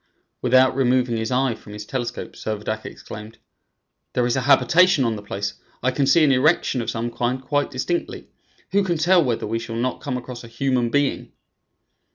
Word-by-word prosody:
Without 130 +1 +4
removing 125 -2 +2
his 110 0 -2
eye 130 -1 +2
from 105 -1 -12
his 105 0 -7
telescope, 120 0 -4
Servadac 110 0 -4
exclaimed: 110 +2 -10 0.8
"There 125 - +1
is 120 - +1
a 130 - 0
habitation 165 +4 +4
on 115 -1 0
the 105 - -7
place; 100 0 -4 0.3
I 130 - +2
can 135 +1 0
see 155 +4 +5
an 145 - +5
erection 135 -1 +2
of 115 - -4
some 120 +1 -3
kind 120 +2 -1
quite 145 +2 -1
distinctly. 170 +7 -3 0.4
Who 200 +1 +3
can 175 -3 0
tell 175 +2 +4
whether 120 -5 -1
we 115 +2 -2
shall 115 0 -6
not 125 +2 -2
come 125 -3 -3
across 125 -1 -8
a - - -10
human 120 0 0
being?" 145 +2 -1
125 Hz, 190 wpm, -22 LUFS, 115-135 Hz, 0.8 s, see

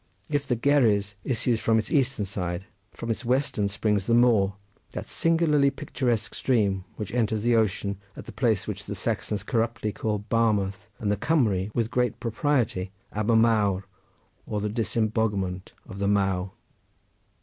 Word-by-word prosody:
If 145 -2 -1
the 125 - +1
Gerres 110 -8 +3
issues 120 -2 +1
from 115 0 +2
its 110 - -2
eastern 135 -7 +2
side, 90 -2 -3 0.3
from 115 - -4
its 115 - -3
western 125 -4 +1
springs 105 -1 0
the 115 - +4
Maw 115 -5 +4 0.4
that - - -5
singularly 160 -4 +3
picturesque 125 -6 -2
stream, 100 -7 +1
which 105 0 -6
enters 110 -3 0
the 120 0 +3
ocean 100 -2 0 0.2
at - - -8
the - - -8
place 115 -7 +1
which - - -5
the - - -5
Saxons 105 -2 -2
corruptly 115 -1 -1
call 105 0 -1
Barmouth 105 -2 +1
and 105 -2 -1
the 105 - +1
Cumry 105 - +1
with 115 0 0
great 125 -1 0
propriety 115 -5 0 0.2
Aber 110 +2 +1
Maw 110 -4 +3 0.7
or 105 - -2
the 105 +1 -1
disemboguement 110 -4 -1 0.2
of 100 - -8
the 100 - 0
Maw. 95 -2 +1
110 Hz, 155 wpm, -26 LUFS, 100-120 Hz, 0.7 s, the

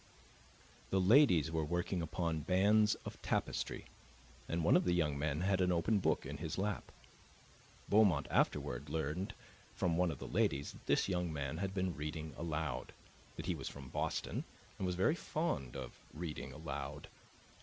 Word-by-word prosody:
The 95 - +2
ladies 95 - +6
were 80 -1 0
working 85 +3 -1
upon 80 0 -1
bands 100 +6 +4
of - - -7
tapestry, - - -1 0.6
and 85 0 0
one 80 - +5
of - - +5
the 90 -1 +2
young 75 -4 +2
men 75 +2 -1
had 95 0 +2
an 90 0 +3
open 90 +5 +2
book - - +1
in 75 +2 -5
his 80 +1 -4
lap. 100 +1 -2 1.0
Beaumont 100 -10 +5
afterward 70 +4 +1
learned 80 +5 -2 0.4
from 85 -2 +1
one 90 0 +3
of 75 - -4
the - - -7
ladies 70 +1 +1
that - - -16
this - - +3
young 90 -3 0
man 70 0 -3
had 95 +1 -2
been 95 -3 0
reading 75 +1 -4
aloud, 80 -6 -3 0.4
that 80 - -6
he 90 - +1
was 70 -5 -5
from 70 -2 -10
Boston - - -2 0.4
and 95 - 0
was 90 - -1
very 95 - +3
fond 155 - -2
of 65 -3 -7 0.2
reading 80 -1 -5
aloud. - - -5
85 Hz, 165 wpm, -36 LUFS, 75-95 Hz, 1.0 s, ladies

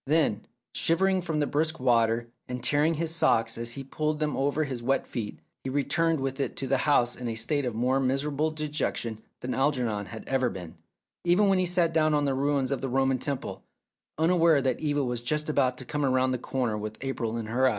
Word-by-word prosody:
Then, 145 -8 +2 0.3
shivering 190 +3 +2
from 160 -3 -2
the 145 - +2
brisk 160 +3 -1
water, 115 -2 +2 0.2
and 125 -1 -5
tearing 150 +3 +3
his 165 +1 0
socks 115 -8 +2
as 115 0 -3
he 135 - -6
pulled 150 +3 -2
them 150 -1 0
over 145 +3 +1
his 130 -5 -4
wet 135 +3 +1
feet, 110 -4 -5 0.3
he 135 - -3
returned 160 +4 +1
with 135 +1 -3
it 135 - -2
to 135 - -3
the 135 0 +2
house 120 -4 +3
in 125 - -5
a 115 - -2
state 135 +5 0
of 120 -3 -2
more 125 +4 +2
miserable 140 +3 0
dejection 150 -7 -3 0.2
than 125 - -3
Algernon 125 -7 0
had 110 - -9
ever 130 -2 +1
been, 90 -6 -8 0.5
even 180 +4 +4
when 190 -1 +3
he 185 - +1
sat 175 -2 +1
down 155 -1 +3
on 145 -1 +2
the 140 - +1
ruins 140 0 0
of 140 - -1
the 135 - -2
Roman 135 0 +2
temple, 140 0 -4 0.5
unaware 165 -2 +4
that 130 -2 0
Eva 145 -2 0
was 120 -2 -2
just 150 +5 -1
about 130 -4 +2
to 130 - -6
come 150 +3 -2
round 130 -1 +2
the 125 - -2
corner 125 -3 -1
with 110 +1 -5
April 120 -4 -2
in 115 - -3
her 125 +4 +2
eyes. - - +5
135 Hz, 220 wpm, -28 LUFS, 125-150 Hz, 0.5 s, eyes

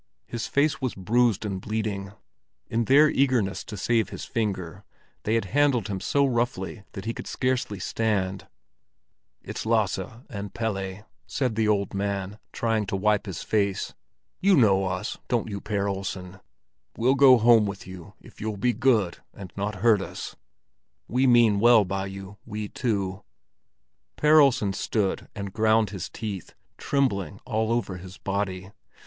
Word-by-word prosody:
His 120 -1 -4
face 145 +1 +1
was 130 -2 -2
bruised 110 +2 +2
and 95 -2 -3
bleeding; 105 -2 -3 0.5
in 115 0 0
their 145 +5 +6
eagerness 125 -8 +1
to 105 - -7
save 115 +1 +1
his - - -7
finger, 95 -7 -3 0.4
they 110 - +2
had 115 - +1
handled 140 -8 +3
him 95 -2 -2
so 140 +8 +2
roughly 120 -5 -1
that 95 - -7
he 115 - -1
could - - -8
scarcely 125 -5 -1
stand. 95 -2 -1 1.0
"It's - - -5
Lasse - - +1 0.3
and 100 -2 -7
Pelle," 100 -3 -3 0.2
said 130 -4 -1
the 110 0 +1
old 100 -2 +1
man, 100 0 -3
trying 110 -3 0
to 100 - -2
wipe 105 +2 +1
his 95 - -5
face. 100 -3 0 0.5
"You 195 0 +4
know 95 -6 +4
us, 90 +3 -3
don't 115 -2 0
you, 100 -1 -4
Per 100 -2 -1
Olsen? 95 -1 -5 0.6
We'll 125 +3 +3
go 135 -2 +7
home 115 -2 +5
with 100 -1 -6
you 95 +1 -11
if - - -16
you'll 110 -1 -3
be 120 +4 +1
good 110 -7 +2 0.2
and 95 -3 -10
not 105 +1 -2
hurt 110 -4 +5
us; - - -7 0.7
we 130 +3 +2
mean 120 -4 +5
well 115 -1 +6
by 95 +1 -3
you, 95 +1 -9
we 105 -2 -5
two." 100 -5 -2 0.9
Per 155 +1 +5
Olsen 125 -8 +4
stood 100 0 -1
and 100 -1 -5
ground 110 -1 +3
his 95 -3 -5
teeth, 100 -5 -6 0.2
trembling 100 - 0
all 110 -1 0
over 115 -6 -1
his 95 +1 -11
body. 95 -1 -3
105 Hz, 155 wpm, -26 LUFS, 95-120 Hz, 1.0 s, go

